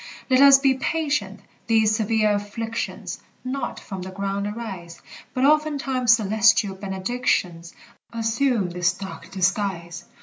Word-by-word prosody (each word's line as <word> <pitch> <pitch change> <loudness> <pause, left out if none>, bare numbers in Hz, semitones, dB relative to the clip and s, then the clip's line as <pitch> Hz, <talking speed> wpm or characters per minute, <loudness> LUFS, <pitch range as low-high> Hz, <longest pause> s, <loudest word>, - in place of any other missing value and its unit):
Let 255 +1 +5
us 280 -1 +9
be 270 -1 +3
patient! 265 -8 -2 0.3
These 220 -2 +3
severe 215 -1 +1
afflictions 225 +3 -4 0.2
Not 265 +2 -4
from 190 -3 -8
the 185 - -6
ground 195 +1 -3
arise, 190 -6 -7 0.4
But 255 +1 +2
oftentimes 280 -5 +3
celestial 215 -1 +3
benedictions 190 -3 -2 0.4
Assume 230 -3 0
this 175 0 +1
dark 195 +1 -9
disguise. 185 -3 -2
215 Hz, 115 wpm, -23 LUFS, 190-250 Hz, 0.4 s, us